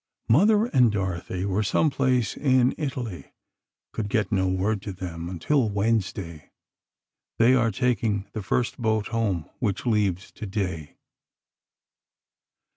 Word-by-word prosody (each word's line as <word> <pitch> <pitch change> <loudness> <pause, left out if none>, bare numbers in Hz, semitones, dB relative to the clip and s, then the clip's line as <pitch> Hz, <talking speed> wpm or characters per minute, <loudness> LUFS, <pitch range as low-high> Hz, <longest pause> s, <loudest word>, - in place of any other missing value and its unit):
Mother 205 - +5
and 125 - +3
Dorothy 95 -2 -3
were 100 +1 0
some 115 +9 +2
place 130 -5 +1
in 130 -3 +3
Italy—could 120 - -7
get 105 -2 0
no 95 -2 +2
word 95 +3 0
to 105 - -5
them 85 -2 -6
until 110 - +1
Wednesday. 100 -6 -2 0.9
They 115 +3 +5
are 120 -3 +3
taking 115 -3 0
the 110 - -4
first 120 +6 -1
boat 110 -2 0
home, 105 -9 -1
which 100 - -2
leaves 100 -5 0
today. 95 -7 -4
105 Hz, 120 wpm, -25 LUFS, 95-125 Hz, 0.9 s, Mother